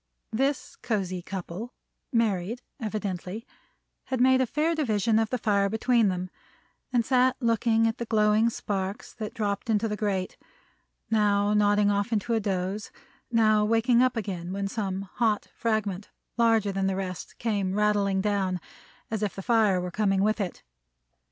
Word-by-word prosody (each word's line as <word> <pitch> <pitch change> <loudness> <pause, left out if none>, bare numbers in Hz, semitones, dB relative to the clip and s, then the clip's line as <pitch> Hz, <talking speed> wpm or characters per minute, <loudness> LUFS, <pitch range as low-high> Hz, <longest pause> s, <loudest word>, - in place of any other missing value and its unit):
This 270 +5 -1
cosy 190 -5 -2
couple 190 +5 -6 0.4
(married, 230 -1 0 0.2
evidently) 210 -1 -4 0.6
had 260 - -2
made 260 +1 +5
a 260 - +1
fair 310 +6 +1
division 225 - +1
of 225 -1 0
the 250 - -1
fire 200 -3 +1
between 230 +1 +2
them, 185 -1 -2 0.6
and 240 -2 +2
sat 255 0 +3
looking 230 -1 +2
at 225 +2 0
the 235 - -2
glowing 215 +1 +3
sparks 195 -3 -4
that 215 -2 -6
dropped 205 0 -2
into 220 0 +2
the 210 - -2
grate; 200 -3 -2 0.7
now 205 -1 +3
nodding 205 0 +3
off 200 +3 0
into 225 +2 0
a 225 - +3
doze; 195 0 -2 0.4
now 215 -2 +4
waking 230 +3 +3
up 255 -1 +2
again 185 -5 -4
when 200 +1 -2
some 195 -2 -3
hot 210 +2 0
fragment, 210 -4 -2 0.3
larger 225 -3 +3
than 195 0 0
the 190 - 0
rest, 185 -2 -5
came 200 -5 -1
rattling 205 -2 +2
down, 190 -3 0 0.5
as 220 -2 -2
if 210 -2 -1
the 195 - -6
fire 220 -5 +3
were 180 0 -4
coming 195 -1 +1
with 215 +1 +1
it. 185 - -5
210 Hz, 160 wpm, -27 LUFS, 195-230 Hz, 0.7 s, made